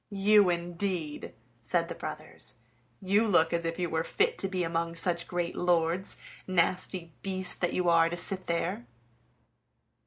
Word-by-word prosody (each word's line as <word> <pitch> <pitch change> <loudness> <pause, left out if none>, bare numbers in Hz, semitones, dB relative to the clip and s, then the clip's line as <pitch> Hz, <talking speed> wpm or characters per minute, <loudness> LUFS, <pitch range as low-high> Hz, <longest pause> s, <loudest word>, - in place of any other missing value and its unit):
"You, 205 -1 +4
indeed!" 175 -2 -3 0.2
said 170 +8 0
the - - -5
brothers, - - -5 0.5
"you 205 +4 +3
look 165 -4 +3
as 170 0 -1
if 165 0 -2
you 180 -1 -1
were 160 0 -1
fit 450 - 0
to 195 - 0
be 185 -2 -2
among 165 0 -2
such 170 0 -1
great 175 -1 -3
lords, 175 +1 +1 0.3
nasty 180 -1 0
beast 190 -2 +1
that 175 - 0
you 180 -1 0
are 165 -1 +5
to 175 - -4
sit 185 +1 +2
there!" 170 -7 -2
175 Hz, 155 wpm, -29 LUFS, 165-185 Hz, 0.5 s, are